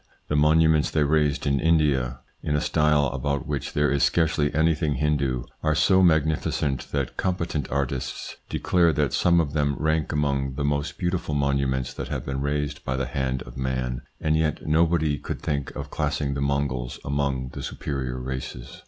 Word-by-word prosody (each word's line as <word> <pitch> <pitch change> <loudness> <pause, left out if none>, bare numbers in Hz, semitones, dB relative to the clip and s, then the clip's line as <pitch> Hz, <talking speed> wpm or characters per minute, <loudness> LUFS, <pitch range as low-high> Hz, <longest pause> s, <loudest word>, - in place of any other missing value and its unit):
The 75 - +1
monuments 80 +1 +4
they 75 - +2
raised 75 -1 +1
in 70 -1 +2
India, 70 -6 +2 0.2
in 75 - -1
a - - +2
style 75 -1 +3
about 70 +1 -2
which 70 -4 -3
there 75 0 +2
is 70 -1 +1
scarcely 80 -3 +2
anything 80 -1 +1
Hindoo, 70 -5 0 0.2
are 80 0 +1
so 95 +5 +4
magnificent 80 -5 +1
that 70 -3 -2
competent 85 -5 -1
artists 70 -2 -3
declare 85 -3 +2
that 75 -1 0
some 85 -1 +4
of 75 -4 0
them 70 -2 +1
rank 80 0 0
among 70 -3 0
the 70 - -2
most 70 +1 -1
beautiful 90 -4 -1
monuments 70 -2 0
that - - -5
have - - -4
been 65 0 -3
raised 75 0 -2
by 65 - -2
the 65 - -1
hand 65 0 -2
of - - -11
man; 65 -2 -2 0.2
and 80 0 +1
yet 80 -1 0
nobody 80 -1 +2
could - - -5
think 70 -2 -2
of - - -6
classing 70 -1 -1
the 70 - -3
Mongols 70 -3 -1
among 70 -2 -1
the - - -7
superior 65 -3 -4
races. 65 -1 -6
70 Hz, 175 wpm, -25 LUFS, 70-75 Hz, 0.2 s, monuments